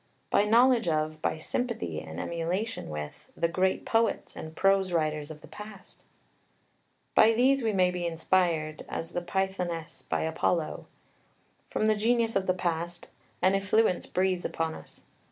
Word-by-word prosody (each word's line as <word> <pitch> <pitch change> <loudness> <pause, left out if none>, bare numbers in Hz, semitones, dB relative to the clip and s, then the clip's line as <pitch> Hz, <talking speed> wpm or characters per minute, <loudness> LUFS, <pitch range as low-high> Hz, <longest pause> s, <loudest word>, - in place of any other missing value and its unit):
By 205 - +4
knowledge 235 0 +5
of, 155 -1 0
by - - 0
sympathy 155 - -2
and 80 +1 -8
emulation 180 - -2
with, 75 -1 -7
"the 170 - +2
great 185 +3 0
poets 225 0 +1
and 160 0 -8
prose 195 0 +3
writers 155 -3 0
of 155 -1 -9
the - - -13
past." 210 -2 -11 1.1
By 225 +1 +6
these 260 +4 +4
we 225 -2 +1
may 185 -3 +3
be 175 -1 -2
inspired, 165 -2 0
as 165 +1 -4
the 175 - -2
Pythoness 175 -3 -2
by - - 0
Apollo. 160 0 -1 0.8
From - - 0
the 215 0 +4
genius 230 +1 +1
of 195 -1 +1
the 185 - +2
past 175 -1 -3 0.3
"an 185 - +5
effluence 195 0 +2
breathes 185 -1 0
upon 160 0 -2
us." - - -12
180 Hz, 155 wpm, -28 LUFS, 160-210 Hz, 1.1 s, By